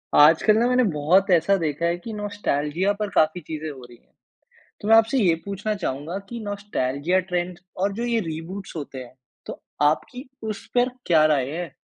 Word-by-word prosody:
आजकल 165 Hz, +8 st, +6 dB
ना 235 Hz, +2 st, +3 dB
मैंने 250 Hz, 0 st, +3 dB
बहुत 165 Hz, +7 st, +3 dB
ऐसा 175 Hz, +3 st, +4 dB
देखा 160 Hz, -1 st, -2 dB
है 170 Hz, +1 st, +1 dB
कि 225 Hz, -, -6 dB
नॉस्टैल्जिया 195 Hz, -4 st, -1 dB
पर 210 Hz, -1 st, -1 dB
काफ़ी 160 Hz, +3 st, +3 dB
चीज़ें 155 Hz, 0 st, -6 dB
हो 135 Hz, -3 st, -10 dB
रही 120 Hz, -1 st, -15 dB
है। -, -, -36 dB, 0.7 s
तो 205 Hz, -, -5 dB
मैं 225 Hz, -, +7 dB
आपसे 225 Hz, +4 st, +4 dB
ये 185 Hz, -9 st, +4 dB
पूछना 200 Hz, +2 st, -2 dB
चाहूँगा 150 Hz, +7 st, -3 dB
कि 235 Hz, -, -6 dB
नॉस्टैल्जिया 185 Hz, -5 st, -1 dB
ट्रेंड 175 Hz, 0 st, -2 dB, 0.2 s
और 200 Hz, +2 st, 0 dB
जो 230 Hz, +4 st, -4 dB
ये 235 Hz, -1 st, +1 dB
रीबूट्स 175 Hz, +2 st, -6 dB
होते 140 Hz, -4 st, -6 dB
हैं, 120 Hz, -, -15 dB, 0.3 s
तो -, -, -8 dB, 0.2 s
आपकी 245 Hz, -, 0 dB
उस 215 Hz, -2 st, -5 dB
पर 245 Hz, +1 st, +4 dB, 0.2 s
क्या 160 Hz, -3 st, +5 dB
राय 140 Hz, -4 st, +2 dB
है? 165 Hz, -2 st, -5 dB
180 Hz, 185 wpm, -24 LUFS, 155-205 Hz, 0.7 s, मैं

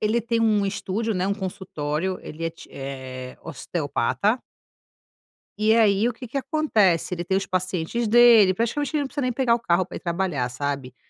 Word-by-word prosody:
ele 215 Hz, +2 st, +1 dB
tem 230 Hz, 0 st, -1 dB
um 210 Hz, -3 st, +3 dB
estúdio, 200 Hz, +3 st, -2 dB
né, 185 Hz, 0 st, -1 dB
um 200 Hz, -, +1 dB
consultório 185 Hz, -3 st, -3 dB
ele 160 Hz, +2 st, -8 dB
é 165 Hz, -, -1 dB
ti 165 Hz, -, -15 dB
eh, 130 Hz, -2 st, -7 dB
osteopata 175 Hz, -, -1 dB, 1.2 s
e 215 Hz, +1 st, +3 dB
aí, 220 Hz, 0 st, +4 dB
o -, -, -5 dB
que 250 Hz, +2 st, -9 dB
que 260 Hz, +5 st, -4 dB
acontece? 250 Hz, -, +1 dB
Ele 175 Hz, -1 st, -3 dB
tem 190 Hz, +2 st, 0 dB
os 195 Hz, -, -2 dB
pacientes 185 Hz, +5 st, -2 dB
dele 230 Hz, -4 st, +7 dB
praticamente 260 Hz, +7 st, -1 dB
ele 295 Hz, -, +2 dB
não 280 Hz, -, -2 dB
precisa 285 Hz, +1 st, -4 dB
nem 255 Hz, -1 st, 0 dB
pegar 245 Hz, -1 st, +2 dB
o 235 Hz, -, +1 dB
carro 180 Hz, -4 st, +1 dB
pra -, -, -10 dB
ir -, -, -9 dB
trabalhar, 170 Hz, -7 st, -1 dB
sabe. 135 Hz, 0 st, -4 dB
195 Hz, 190 wpm, -24 LUFS, 165-230 Hz, 1.2 s, dele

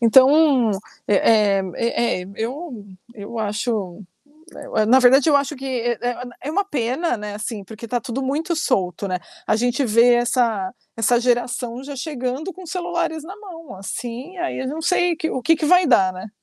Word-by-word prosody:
Então, 265 Hz, +1 st, +5 dB, 0.4 s
eh 205 Hz, -, +2 dB, 0.4 s
eh -, -, +1 dB, 0.2 s
eh 235 Hz, -3 st, 0 dB
eh, 180 Hz, -, -10 dB
eu 245 Hz, -1 st, -5 dB, 0.3 s
eu 215 Hz, +2 st, -7 dB
acho, 210 Hz, -3 st, -2 dB, 0.5 s
eh, -, -, -9 dB, 0.2 s
eu -, -, +1 dB
na 255 Hz, +4 st, +6 dB
verdade 265 Hz, +4 st, +5 dB
eu 285 Hz, -, +6 dB
acho 280 Hz, +1 st, -1 dB
que, 270 Hz, -, -9 dB
eh 240 Hz, -3 st, -1 dB
eh, 245 Hz, 0 st, -2 dB, 0.2 s
é 290 Hz, -, -3 dB
uma 400 Hz, +5 st, +1 dB
pena, 270 Hz, -2 st, -1 dB
né, 210 Hz, -1 st, -6 dB
assim, 215 Hz, -1 st, -5 dB
porque 220 Hz, +3 st, -10 dB
tá 245 Hz, +1 st, -1 dB
tudo 265 Hz, +1 st, -4 dB
muito 310 Hz, +6 st, -1 dB
solto, 195 Hz, -, -1 dB
né. 185 Hz, -, -1 dB, 0.3 s
A -, -, +2 dB
gente 245 Hz, +4 st, +1 dB
vê 235 Hz, +2 st, +5 dB
essa 235 Hz, -5 st, +1 dB, 0.2 s
essa 230 Hz, +2 st, +3 dB
geração 245 Hz, 0 st, -1 dB
já 280 Hz, 0 st, -7 dB
chegando 270 Hz, +4 st, -4 dB
com 370 Hz, +1 st, -12 dB
celulares 345 Hz, -3 st, -2 dB
na 380 Hz, +4 st, -8 dB
mão, 335 Hz, -, -11 dB
assim, 240 Hz, -, -6 dB
aí 350 Hz, -, -3 dB
eu 260 Hz, -, -3 dB
não 310 Hz, +4 st, -5 dB
sei 350 Hz, -1 st, +2 dB
que 320 Hz, -, -2 dB
o 260 Hz, -, -2 dB
que 325 Hz, +5 st, +3 dB
que 310 Hz, -, -3 dB
vai 360 Hz, +2 st, +5 dB
dar, 195 Hz, -9 st, +4 dB
né? 185 Hz, +4 st, -8 dB
250 Hz, 190 wpm, -21 LUFS, 225-310 Hz, 0.5 s, na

